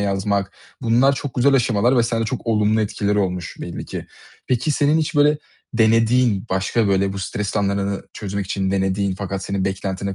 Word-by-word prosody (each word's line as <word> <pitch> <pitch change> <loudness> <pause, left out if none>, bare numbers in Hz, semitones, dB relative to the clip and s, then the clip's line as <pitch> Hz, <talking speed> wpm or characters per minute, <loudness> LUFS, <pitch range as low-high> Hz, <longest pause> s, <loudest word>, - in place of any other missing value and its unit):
yazmak, 100 0 0 0.3
bunlar 120 +4 +4
çok 140 0 -5
güzel 135 +3 +3
aşamalar 120 0 +2
ve 120 - +5
sende 115 -1 0
çok 125 +2 -4
olumlu 110 -1 +2
etkileri 105 -1 0
olmuş 90 -3 -2
belli - - -6
ki. - - -6 0.4
Peki, 125 +3 0
senin 145 +2 +3
hiç 155 0 -2
böyle 145 +1 +4 0.4
denediğin, 115 -1 +3
başka 95 +4 +1
böyle 95 0 +2
bu 100 - -5
stres 100 +2 -3
anlarını 100 -1 0
çözmek 100 -1 -4
için 95 0 -1
denediğin 95 0 0
fakat 95 0 -4
senin 100 -1 -2
beklentini 95 0 -3
105 Hz, 170 wpm, -21 LUFS, 95-120 Hz, 0.4 s, ve